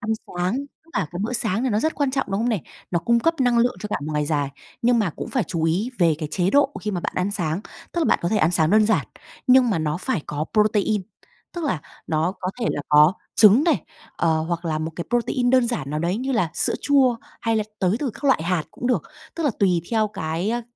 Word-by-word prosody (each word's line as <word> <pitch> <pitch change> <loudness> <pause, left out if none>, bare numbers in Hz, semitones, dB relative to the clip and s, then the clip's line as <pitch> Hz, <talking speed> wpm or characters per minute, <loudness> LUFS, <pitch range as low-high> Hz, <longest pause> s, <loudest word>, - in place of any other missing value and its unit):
ăn 220 -2 -4 0.2
sáng, 180 +1 -2 0.3
tức 330 - -23
là 190 - 0
cái 175 - -5
bữa 225 - -2
sáng 230 -2 0
thì 265 - +1
nó 210 -3 +1
rất 315 +5 0
quan 285 -2 0
trọng, 270 +1 -1
đúng 195 +2 0
không 235 - +1
này? 215 -9 0 0.3
Nó 175 - +1
cung 235 +8 +2
cấp 330 +7 +2
năng 245 -2 +3
lượng 240 -3 +2
cho 210 - -4
cả - - -1
một 155 - -3
ngày 150 -1 0
dài. 145 -2 0 0.3
Nhưng 240 0 +4
mà 205 -6 +1
cũng - - -5
phải 255 -6 0
chú 165 -2 -3
ý 180 +9 0
về 170 -4 +4
cái 155 -2 -4
chế 180 +1 +1
độ 285 +2 +4
khi 210 - -3
mà 180 -3 -2
bạn - - -3
ăn 185 +2 0
sáng, 175 -4 -1 0.3
tức - - -3
là - - +2
bạn - - +3
có 170 - +1
thể 215 - +1
ăn 165 -5 +3
sáng 160 -3 +2
đơn 215 +1 +5
giản, 210 -10 +1 0.4
nhưng 255 -1 +6
mà 200 - +1
nó 155 -1 -1
phải 185 - -2
có 150 +1 -2
protein, 210 -1 +2 0.5
tức 345 -2 -4
là 185 - -1 0.3
nó 160 +3 0
có 185 - -2
thể 230 - 0
là - - -2
có 150 +3 +6 0.2
trứng 220 +7 +7
này, 340 - +2 0.3
ờ, 160 -2 +2
hoặc 170 +1 -3
là 155 -2 -1
một 155 +1 -3
cái 170 - -3
protein, 245 +1 +1
đơn 255 -2 +4
giản 150 - -3
nào 150 - -1
đấy 170 +4 0
như 260 +4 -2
là 180 -10 +1
sữa - - +1
chua, 265 -4 +4 0.2
hay 225 -1 +1
là 215 - 0
tới 190 +1 +2
từ 275 -2 -2
các - - -12
loại 270 - +3
hạt 170 -1 0
cũng 245 - -5
được, 250 - +1 0.3
tức 335 - -3
là 290 - +3
tùy 180 -4 +3
theo 220 -2 +2
cái, 165 +1 -3
a, 240 +1 -1
205 Hz, 270 wpm, -23 LUFS, 170-245 Hz, 0.5 s, trứng